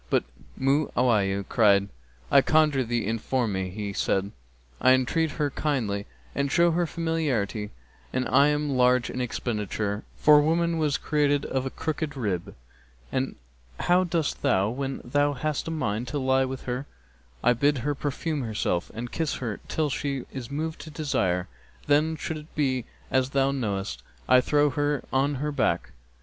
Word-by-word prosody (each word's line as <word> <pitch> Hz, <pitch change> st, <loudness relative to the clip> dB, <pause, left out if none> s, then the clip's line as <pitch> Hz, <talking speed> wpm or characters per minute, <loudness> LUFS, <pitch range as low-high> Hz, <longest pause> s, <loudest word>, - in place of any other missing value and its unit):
but -, -, +2 dB, 0.4 s
Mu'awiyah 120 Hz, -8 st, +2 dB
cried, 100 Hz, -3 st, +4 dB, 0.4 s
'I 140 Hz, -, +7 dB
conjure 150 Hz, -3 st, +3 dB
thee 120 Hz, 0 st, -1 dB
inform 115 Hz, +1 st, -1 dB
me.' 95 Hz, -1 st, -2 dB
He 100 Hz, +1 st, -5 dB
said, 95 Hz, +1 st, 0 dB, 0.5 s
'I 130 Hz, -, +6 dB
entreat 150 Hz, +5 st, +1 dB
her 145 Hz, -3 st, -1 dB
kindly 115 Hz, -10 st, -1 dB, 0.3 s
and 140 Hz, 0 st, -1 dB
show 170 Hz, +2 st, +4 dB
her 170 Hz, +1 st, +1 dB
familiarity 140 Hz, -12 st, -1 dB, 0.4 s
and 130 Hz, 0 st, -1 dB
am 145 Hz, +2 st, +3 dB
large 125 Hz, -1 st, +3 dB
in 125 Hz, -, -3 dB
expenditure, 105 Hz, -3 st, -2 dB
for 150 Hz, -1 st, +7 dB
woman 165 Hz, +2 st, +1 dB
was 150 Hz, -3 st, +1 dB
created 145 Hz, -2 st, +1 dB
of 130 Hz, 0 st, -1 dB
a -, -, -2 dB
crooked 155 Hz, 0 st, -3 dB
rib.'[FN#270] 100 Hz, -8 st, -2 dB, 0.6 s
'And 130 Hz, +1 st, -1 dB, 0.4 s
how 180 Hz, +1 st, +3 dB
dost 165 Hz, -4 st, -1 dB
thou 105 Hz, -7 st, +2 dB
when 135 Hz, +2 st, -3 dB
thou 145 Hz, +3 st, +1 dB
hast 155 Hz, +1 st, -2 dB
a -, -, -1 dB
mind 120 Hz, -7 st, -2 dB
to 145 Hz, -, -3 dB
lie 130 Hz, -1 st, +2 dB
with 130 Hz, 0 st, -5 dB
her?' 125 Hz, +3 st, -3 dB, 0.6 s
'I 125 Hz, -, +5 dB
bid 140 Hz, +4 st, +2 dB
her 145 Hz, -, +1 dB
perfume 145 Hz, +2 st, -2 dB
herself 105 Hz, -6 st, -1 dB
and 120 Hz, +1 st, -5 dB
kiss 160 Hz, -3 st, -1 dB
her 115 Hz, -5 st, -4 dB
till 155 Hz, -2 st, 0 dB
she 135 Hz, -2 st, -2 dB
is 130 Hz, -3 st, -6 dB
moved 155 Hz, +3 st, -3 dB
to 160 Hz, -, -9 dB
desire; 95 Hz, -, 0 dB, 0.4 s
then, 150 Hz, +2 st, +3 dB
should 160 Hz, 0 st, -4 dB
it 150 Hz, +1 st, -13 dB
be 130 Hz, -5 st, 0 dB, 0.3 s
as 130 Hz, 0 st, +2 dB
thou 135 Hz, 0 st, +2 dB
knowest,[FN#271] 100 Hz, -, -3 dB, 0.2 s
I 130 Hz, 0 st, +7 dB
throw 145 Hz, +2 st, +2 dB
her 145 Hz, +1 st, 0 dB
on 140 Hz, +2 st, +2 dB
her 150 Hz, +3 st, -2 dB
back. 145 Hz, -, 0 dB
135 Hz, 160 wpm, -26 LUFS, 115-150 Hz, 0.6 s, I